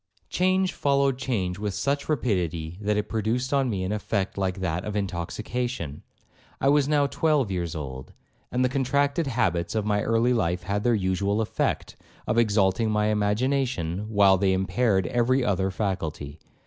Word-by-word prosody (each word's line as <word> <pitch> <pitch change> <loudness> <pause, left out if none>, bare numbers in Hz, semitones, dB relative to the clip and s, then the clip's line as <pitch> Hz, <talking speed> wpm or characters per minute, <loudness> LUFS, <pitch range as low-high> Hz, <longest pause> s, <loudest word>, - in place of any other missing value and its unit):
'Change 185 +1 +1
followed 140 -2 +1
change 100 -9 -2
with 105 -2 -3
such 140 +1 -1
rapidity, 90 - -1
that 105 0 0
it 105 0 -1
produced 115 +5 -1
on 135 -2 +2
me 95 -4 -2
an 95 - -2
effect 105 -2 -2
like 95 -1 -2
that 90 -1 -2
of 105 - -4
intoxication. 100 - -3 0.6
I 135 - +3
was 145 -1 +4
now 145 -1 +3
twelve 140 -6 +1
years 85 -3 -3
old, 65 -4 -6 0.4
and 125 +1 +1
the - - +4
contracted 140 +4 0
habits 100 - 0
of 110 -2 0
my 105 -1 +1
early 115 +3 +2
life 90 -6 0
had 100 +3 -3
had 105 0 -1
their 120 -1 +4
usual 100 +1 0
effect, 110 - -2 0.3
of 115 - +1
exalting 105 -1 +2
my 105 0 +1
imagination, 105 -3 0
while 100 -3 +5
they 95 -1 +2
impaired 95 +1 +1
every 120 +6 +1
other 95 -2 +1
faculty. 80 -7 -3
105 Hz, 165 wpm, -26 LUFS, 95-125 Hz, 0.6 s, while